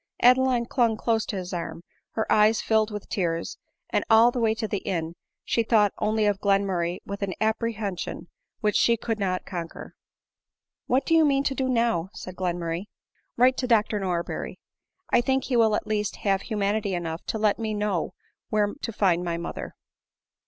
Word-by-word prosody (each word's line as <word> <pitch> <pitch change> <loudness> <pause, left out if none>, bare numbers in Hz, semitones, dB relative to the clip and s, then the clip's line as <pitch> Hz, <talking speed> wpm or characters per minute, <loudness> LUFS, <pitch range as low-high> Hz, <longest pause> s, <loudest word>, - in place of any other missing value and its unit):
Adeline 250 -1 +5
clung 235 -3 +1
close 225 -1 0
to - - -3
his 185 -1 -5
arm, 170 -1 -5 0.3
her 220 - -1
eyes 215 +1 +5
filled 220 -1 +2
with 210 -2 -7
tears, 170 -3 -2 0.3
and - - +1
all 225 +2 +7
the 245 - -3
way 220 -1 +2
to 220 -1 -3
the 205 -2 -2
inn 165 -4 -3 0.3
she 230 - +1
thought 215 -3 +3
only 215 0 +1
of 205 -2 +1
Glenmurray 195 -4 +1
with 200 0 -6
an 195 -2 -2
apprehension 220 -3 -2 0.3
which 210 -1 +1
she 235 0 +4
could 225 0 -3
not 185 -2 -1
conquer. 170 -3 -7 0.5
" - - -66
What 260 +2 +2
do 330 - +1
you 325 -1 +6
mean 275 -2 +3
to 275 - 0
do 265 0 -1
now 230 -8 +1
?" - - -40
said 185 - -8
Glenmurray. 175 -1 -2 0.3
" - - -45
Write 255 +2 +4
to 250 - -1
Dr 215 -3 +2
Norberry. 180 -3 -3 0.5
I - - +5
think 265 +2 +1
he 255 - -1
will 220 -2 +4
at - - -2
least 210 -1 -1
have 195 -1 +2
humanity 205 -2 -1
enough 165 -1 -4
to - - -1
let 210 0 +2
me 220 -1 -2
know 205 -5 -1 0.3
where 210 -1 +1
to 265 -5 -5
find 180 -5 +2
my 170 -1 -2
moth 170 - -5
er." - - -7
210 Hz, 195 wpm, -26 LUFS, 185-230 Hz, 0.5 s, all